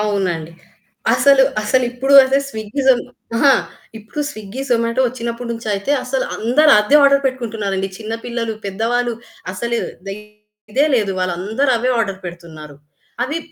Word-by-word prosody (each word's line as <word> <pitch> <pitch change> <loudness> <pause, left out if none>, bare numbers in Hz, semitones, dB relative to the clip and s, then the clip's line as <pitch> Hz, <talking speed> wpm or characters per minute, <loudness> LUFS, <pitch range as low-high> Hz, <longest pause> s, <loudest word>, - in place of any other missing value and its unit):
అవునండి. 185 -6 -1 0.6
అసలు, 275 0 +5 0.2
అసలిప్పుడు 250 +4 +1 0.3
స్విగ్గీ 220 +3 -4
జో 265 - +9 0.4
అహా! 275 +3 +5 0.5
ఇప్పుడు 220 +8 -7
స్విగ్గీ, 215 0 -8
జొమాటో 230 +2 +1
వచ్చినప్పటి 235 0 -5
నుంచయితే, 215 -1 -3
అసలు 260 +1 -1
అందరూ 280 +7 +3
అదే 210 +8 +4
ఆర్డర్ 280 0 +5
పెట్టుకుంటున్నారండి. 215 -7 -2
చిన్న 220 0 -6
పిల్లలు, 235 -2 -3
పెద్దవాళ్ళు 235 +5 -1 0.4
అసలు 235 +5 -2 0.9
ఇదే 280 +5 +3
లేదు. 210 -5 +1
వాళ్ళందరూ 195 +10 -1
అవే 250 +2 0
ఆర్డర్ 195 -4 -2
పెడుతున్నారు. 165 -4 -10 0.5
అవి 295 +6 -3
230 Hz, 120 wpm, -18 LUFS, 200-255 Hz, 0.9 s, జో